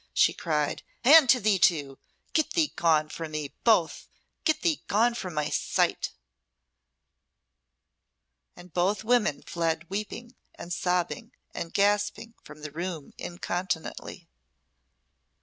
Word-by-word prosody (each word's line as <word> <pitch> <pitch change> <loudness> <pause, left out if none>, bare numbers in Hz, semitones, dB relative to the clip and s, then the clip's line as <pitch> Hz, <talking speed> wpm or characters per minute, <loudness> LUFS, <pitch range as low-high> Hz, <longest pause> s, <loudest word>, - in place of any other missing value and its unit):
she - - +4
cried, 150 -3 -1 0.2
"and 285 +1 +8
to 255 - +6
thee 205 -3 +2
too! 145 -6 +2 0.3
Get 315 -2 +1
thee 320 -4 +1
gone 155 -2 +3
from 160 -1 -7
me, 150 -2 -4
both 215 -8 +2 0.4
get 315 - +1
thee 330 -5 +1
gone 230 +4 +3
from 185 -8 -6
my 150 -1 -1
sight!" - - 0 2.5
And 175 -2 -14
both 195 +4 +1
women 220 -9 +1
fled 165 -1 -2
weeping, 215 +4 -5 0.2
and 175 - -6
sobbing, 180 +8 -1 0.2
and 165 - -5
gasping 205 +3 +1
from 150 0 -13
the 150 - -6
room 165 -1 -5
incontinently. 175 -1 -4
180 Hz, 120 wpm, -27 LUFS, 160-225 Hz, 2.5 s, and